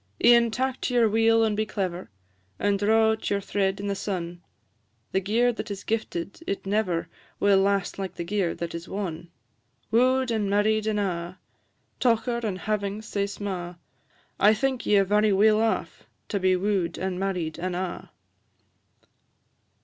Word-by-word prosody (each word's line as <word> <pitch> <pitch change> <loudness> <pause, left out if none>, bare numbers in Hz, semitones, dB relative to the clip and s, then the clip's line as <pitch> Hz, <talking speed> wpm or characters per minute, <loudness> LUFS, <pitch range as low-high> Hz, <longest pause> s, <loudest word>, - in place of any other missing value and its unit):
E'en 235 -1 +6
tak 260 +3 -2
to 250 - -1
your 235 -2 +5
wheel 225 +1 +3
and 215 -2 +1
be 215 - +1
clever, 185 -4 -4 0.5
And 200 -1 +1
draw 220 +2 +4
out 220 - -3
your 200 - +1
thread 195 0 -1
in 200 - -5
the 200 - 0
sun; 175 -3 -4 0.7
The 190 - +2
gear 230 +6 +2
that 220 -1 -6
is 200 -1 -6
gifted, 210 -5 -3
it 200 - -3
never 195 -4 0 0.3
Will 200 -1 +4
last 200 -1 0
like 190 -2 -4
the - - -4
gear 185 -1 -1
that 170 -1 -5
is 170 0 -7
won. 175 -4 -5 0.6
Woo'd, 255 +2 +3
and 215 -3 0
married, 215 +2 +2
an' 215 -1 0
a', 180 -3 -2 0.6
Tocher 235 0 +1
and 205 -4 -2
havings 210 0 -2
sae 200 -1 -1
sma'; 185 -4 -5 0.6
I 210 +2 +6
think 265 +2 -1
ye 205 - +5
are 195 - +5
very 210 +2 +3
weel 215 +2 +4
aff 225 -1 -2 0.2
To 200 - -1
be 185 0 +3
woo'd, 185 -3 -1
and 185 -1 -3
married, 180 -5 -2
and 180 +1 -2
a'." 180 -1 -4
200 Hz, 165 wpm, -26 LUFS, 185-220 Hz, 0.7 s, E'en